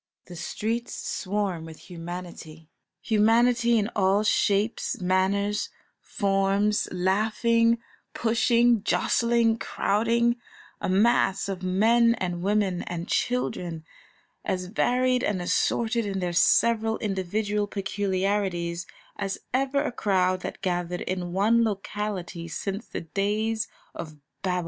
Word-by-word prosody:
The 180 - -10
streets 225 +7 -3
swarm 195 -4 -2
with 160 +3 -12
humanity, 170 -2 -8 0.3
humanity 235 +2 +3
in 215 +1 0
all 195 +1 +3
shapes, 215 +4 +1
manners, 195 +3 +1 0.3
forms, 200 0 +1
laughing, 220 +5 +2 0.4
pushing, 235 0 +3
jostling, 235 +1 +2
crowding, 230 +4 +1 0.4
a - - -1
mass 195 -1 +3
of 190 -2 -4
men 230 +6 +3
and 175 -5 -3
women 195 -2 +1
and 175 +1 -5
children, 175 -10 -1 0.6
as 185 -1 -2
varied 250 +5 +1
and 200 -3 0
assorted 220 +5 0
in 195 -1 -2
their 180 -2 -2
several 225 +4 +3
individual 205 +1 -1
peculiarities 195 -3 -1 0.3
as 195 0 -2 0.2
ever 270 +2 +1
a - - -2
crowd 185 -5 +1
that - - -7
gathered 175 -1 -1
in 180 -1 -3
one 215 +5 +3
locality 200 -5 -3
since 195 +6 -4
the - - -5
days 210 +6 -1 0.3
of 155 -3 -8 0.2
Babel. 180 -2 0
200 Hz, 110 wpm, -26 LUFS, 185-225 Hz, 0.6 s, humanity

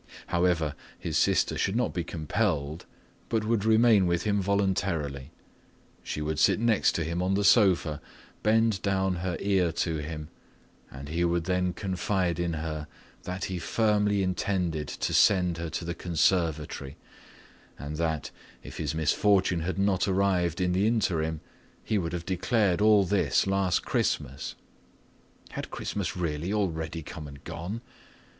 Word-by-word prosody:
However, 85 -4 +2 0.2
his - - -4
sister - - +2
should 95 - 0
not 125 - 0
be 85 -1 -2
compelled 80 -2 -2 0.4
but 110 -1 +1
would 110 -2 +1
remain 110 -3 +5
with 85 0 0
him 105 -2 +1
voluntarily. 90 -8 -1 0.7
She 75 - -4
would 75 0 -2
sit - - +4
next 115 -2 +3
to 85 - -1
him 85 +3 -2
on 95 +1 +1
the 100 - +1
sofa, 95 - +4 0.4
bend 110 -2 +2
down 95 -2 0
her 90 +1 -2
ear 95 -4 +2
to 85 -1 -1
him, 75 0 -6 0.6
and 70 +1 -9
he 85 +3 0
would 85 0 +1
then 90 0 0
confide 95 -2 -1
in 85 -1 -1
her 80 -1 -4 0.4
that 90 +1 -3
he 95 -1 -4
firmly 105 0 +1
intended 90 -4 -1
to - - -3
send 90 -4 +4
her 85 -1 -3
to 85 - -4
the 85 - -2
conservatory 80 -5 0 0.8
and 75 +2 -6
that, 80 -3 -1 0.3
if - - -9
his 80 0 -2
misfortune 90 +3 +2
had 90 +4 -3
not 95 -1 +2
arrived 95 -3 +1
in 90 -1 +1
the 95 +4 +2
interim, 80 -9 0 0.4
he 110 - 0
would 85 -2 -3
have 85 -1 -4
declared 95 0 +1
all 105 -1 +6
this 95 0 +2
last 95 -2 +1
Christmas—had 65 +3 -5
Christmas - - -4
really 85 +1 -2
already 80 -6 -2
come 80 -1 -8
and 70 -1 -12
gone? 85 +7 -5
90 Hz, 150 wpm, -28 LUFS, 80-100 Hz, 0.8 s, all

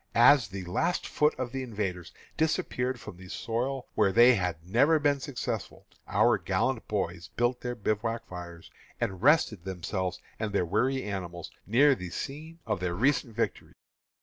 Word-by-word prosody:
As 120 0 +7
the 95 0 -6
last 130 - 0
foot 150 0 +2
of 125 -2 -4
the 135 0 -3
invaders 100 -8 -4 0.2
disappeared 130 -5 0
from 90 - -10
the 90 0 -12
soil 125 +5 -2
where 100 -3 +3
they 120 +5 +7
had 90 -6 -2
never 140 - +4
been 145 -2 +2
successful, 135 -1 -5 0.2
our - - +3
gallant - - -1
boys - - -2
built 120 +1 +1
their 120 0 -3
bivouac 115 +1 -2
fires 85 -2 -9 0.3
and 95 -2 -2
rested 130 - +4
themselves 95 0 -3 0.2
and 110 -2 -2
their 95 -3 +2
weary 130 +9 +1
animals 90 -4 -5 0.2
near 135 +7 +5
the 90 -8 -6
scene 155 - -6
of 105 -4 -1
their 90 -1 -2
recent 125 +1 +1
victory. 115 - -2
115 Hz, 160 wpm, -29 LUFS, 95-130 Hz, 0.3 s, As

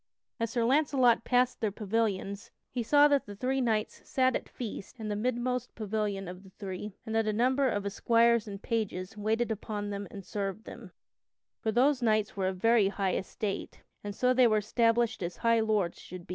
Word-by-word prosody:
As 230 -1 0
Sir 235 0 0
Launcelot 260 -3 +3
passed 250 0 +2
their 215 -2 +1
pavilions, 200 -1 -2 0.2
he 245 - -2
saw 290 +5 +5
that 285 -5 +1
the 205 - -8
three 260 +5 -1
knights 220 -3 -1
sat 260 -1 +1
at - - -4
feast 230 0 -7
in 215 -1 -4
the 205 - -1
midmost 250 +2 -2
pavilion 210 -3 -2
of 180 +1 -8
the 195 - -15
three, 190 +1 -7
and 220 - -5
that 225 -1 +1
a - - +2
number 255 +5 +2
of 205 -3 -2
esquires 230 +2 +3
and 200 -1 -8
pages 215 -3 -2
waited 220 +3 0
upon 205 -1 -4
them 200 0 -5
and 195 -2 -9
served 200 +2 -4
them, 225 -6 -10 0.7
for 220 - -1
those 260 +4 +3
knights 215 -2 +1
were 190 -2 0
of 185 0 -2
very 225 +1 +4
high 195 -1 -1
estate, 195 +1 -4 0.2
and 205 -1 -5
so 250 +2 +3
they 255 -1 +5
were 215 -1 +3
established 230 +1 +1
as 175 0 -4
high 230 -1 +3
lords 215 -6 0
should 180 -1 -10
be. - - -34
220 Hz, 200 wpm, -30 LUFS, 200-240 Hz, 0.7 s, saw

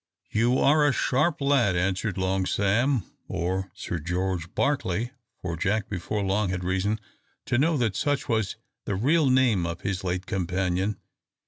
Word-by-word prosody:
"You 120 +4 +3
are 150 +2 +4
a - - +4
sharp 150 +6 +1
lad," 135 -9 +3
answered 95 +3 0
Long 95 0 0
Sam, 115 +4 +2 0.2
or 95 +3 -2
Sir 85 - -4
George 90 +1 -2
Barclay, 120 -5 0 0.3
for 85 -3 -2
Jack 100 +5 0
before 100 +2 -2
long 100 +1 +1
had 90 -1 -2
reason 95 +4 0 0.5
to 120 - +1
know 160 +2 +3
that 115 -6 0
such 145 -1 0
was 110 -6 0 0.3
the 100 - -1
real 140 - +3
name 125 -8 +3
of 85 0 -5
his 100 -1 -2
late 90 0 -2
companion. 95 +2 -1
100 Hz, 155 wpm, -26 LUFS, 95-125 Hz, 0.5 s, are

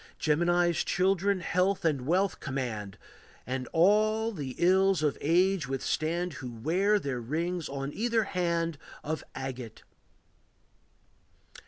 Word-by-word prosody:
Gemini's 175 +2 +2
children 190 +1 +1
health 180 +2 0
and 140 -5 0
wealth 185 +4 +1
command, 120 -8 -4 0.5
And 130 0 -3
all 215 +6 +3
the 140 - -6
ills 190 -1 +3
of 150 -2 +1
age 180 0 +2
withstand, 160 +6 -1
Who 130 - -5
wear 175 - +1
their 135 -10 -3
rings 165 +7 -2
on 140 +1 -4
either 230 0 +1
hand 170 -5 -1 0.2
Of 155 0 -3
agate. 130 -3 -6
170 Hz, 115 wpm, -29 LUFS, 140-190 Hz, 0.5 s, all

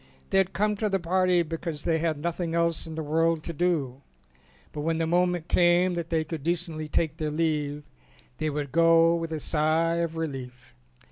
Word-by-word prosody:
They 195 - +4
had 190 -1 +1
come 210 +1 0
to 215 0 0
the 195 -1 +1
party 180 0 +2
because 165 -1 -5
they 165 -1 +1
had 160 -2 0
nothing 170 +2 -3
else 170 -1 0
in 160 - -7
the 160 - -3
world 165 +1 +1
to 170 - -5
do, 150 -6 -1 0.7
but 150 - -4
when 165 +1 0
the 165 - 0
moment 175 0 +1
came 175 +1 +3
that 170 -1 -4
they 160 -1 +1
could 160 -1 -6
decently 165 -1 -2
take 155 0 -1
their 155 -1 -2
leave 150 -2 -1 0.6
they 155 - 0
would 145 -2 -4
go 165 +2 +5
with 165 -1 -3
a 160 - -2
sigh 160 +3 +1
of 165 -1 -2
relief. 130 -6 -6
165 Hz, 195 wpm, -27 LUFS, 155-170 Hz, 0.7 s, go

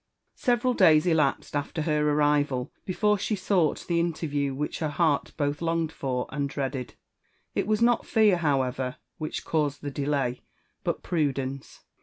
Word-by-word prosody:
Several 245 +1 +1
days 155 -6 +5
elapsed 155 -5 +1
after 145 +2 -2
her 150 -1 +1
arrival 145 -3 +1
before 210 +2 +1
she 215 - -1
sought 185 -5 +1
the 170 -1 +1
inter 170 -1 -1
yiew 140 -2 -1
which 150 +2 -3
her 155 - -1
heart 150 -1 +1
both 145 0 -1
longed 165 -1 0
for 130 -5 -2
and 140 0 -2
dreaded. 135 -3 -4 0.6
It - - -1
was 215 +1 +2
not 240 -1 +3
fear, 215 -4 +4
however, 130 -5 0 0.2
which 155 -1 -4
caused 150 -3 -1
the 145 - -3
delay, 135 -3 -1 0.4
but - - -2
prudence. 140 -5 -2
150 Hz, 155 wpm, -27 LUFS, 140-170 Hz, 0.6 s, days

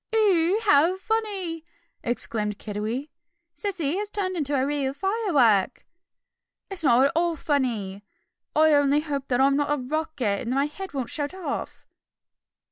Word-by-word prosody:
"Oough, 395 -2 +3
how 320 +6 +4
funny!" 385 -6 -2 0.4
exclaimed 215 -3 -2
Kiddiwee, 220 +8 -4 0.4
"Cece 360 -6 -2
has 415 0 -3
turned 390 -3 -2
into 290 -4 0
a 265 -1 +1
real 280 -2 -1
firework." 290 - +2 0.9
"It's 380 -4 +1
not 255 -1 +5
at 280 - +2
all 340 0 +1
funny. 230 - -2 0.5
I 310 0 +5
only 285 0 +3
hope 280 -3 -4
I'm 270 +3 +4
not 290 0 0
a 295 - +2
rocket, 270 -6 -2
and 245 +1 -3
that - - -1
my 275 +1 +2
head 340 +3 -7
won't 260 -3 -3
shoot 290 +3 -2
off!" 335 -7 -5
290 Hz, 145 wpm, -25 LUFS, 260-350 Hz, 0.9 s, not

